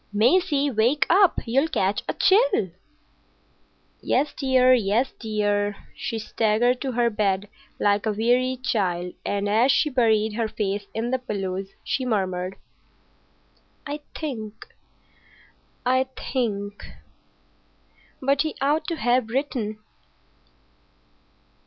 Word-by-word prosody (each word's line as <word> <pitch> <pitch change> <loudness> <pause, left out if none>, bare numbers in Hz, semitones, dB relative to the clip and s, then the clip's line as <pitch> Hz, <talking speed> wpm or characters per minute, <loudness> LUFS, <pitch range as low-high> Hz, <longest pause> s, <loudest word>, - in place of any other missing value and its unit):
"Maisie, 285 - +3
wake 250 +5 +2
up. 380 0 +5
You'll 265 +6 +2
catch 200 -11 0
a - - -1
chill." 390 - +3 1.3
"Yes, 285 +3 0
dear; 255 -2 +4
yes, 235 +2 +2
dear." 205 -2 0 0.2
She 225 - -4
staggered 225 +3 +1
to 265 -2 -2
her 235 0 +2
bed 205 -2 0 0.3
like 205 +1 +2
a - - +2
wearied 250 +4 +1
child, 180 -7 -1
and 205 0 -1
as 225 +6 +4
she 300 +2 +2
buried 220 -4 +2
her 225 0 -1
face 205 -1 -3
in 230 +2 -2
the 260 - +1
pillows 195 -5 -4
she 265 - -1
muttered, 190 -5 -1 1.3
"I 295 0 -4 0.2
think—I 255 0 -6 0.3
think.... 205 -5 -2 1.4
But 275 +1 +2
he 310 -1 -2
ought 290 +3 +1
to 335 - -1
have 245 -5 +1
written." 235 -5 -2
230 Hz, 110 wpm, -24 LUFS, 205-265 Hz, 1.4 s, up